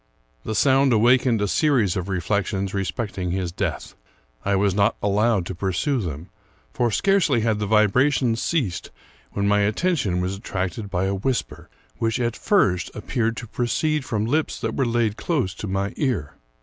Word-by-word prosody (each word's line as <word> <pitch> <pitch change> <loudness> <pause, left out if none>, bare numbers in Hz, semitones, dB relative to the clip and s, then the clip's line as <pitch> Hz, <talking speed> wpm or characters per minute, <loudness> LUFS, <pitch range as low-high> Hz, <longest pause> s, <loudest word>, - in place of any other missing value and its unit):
The 110 - -3
sound 135 +2 +4
awakened 120 0 +3
a - - +1
series 120 - +2
of 95 +1 -3
reflections 95 +1 -1
respect 100 +1 -3
ing 90 -1 -2
his 90 -1 -2
death. - - -3 0.5
I 100 0 +1
was 100 0 +2
not 100 +3 +2
allowed 105 -1 +1
to 95 - -5
pursue 95 - -1
them; 85 0 -6 0.4
for 120 - +1
scarcely 165 - +2
had 110 -1 +1
the 105 - -2
vibrations 115 +3 +3
ceased, 125 - -1 0.4
when 100 0 0
my 105 0 +3
attention 105 - +1
was 90 +2 -2
attracted 95 0 -4
by 95 -1 -1
a 95 - 0
whisper, 115 +6 -3 0.3
which, 115 +2 0
at 120 -1 -1
first, 100 - +1
appeared 115 +1 -2
to 120 - -6
proceed 150 +6 -1
from 110 -4 -2
lips 150 +3 0
that 115 -1 -3
were 135 - +1
laid 115 -2 0
close 130 - -1
to 105 - -6
my 95 +1 -2
ear. 115 - -1
105 Hz, 170 wpm, -23 LUFS, 95-125 Hz, 0.5 s, sound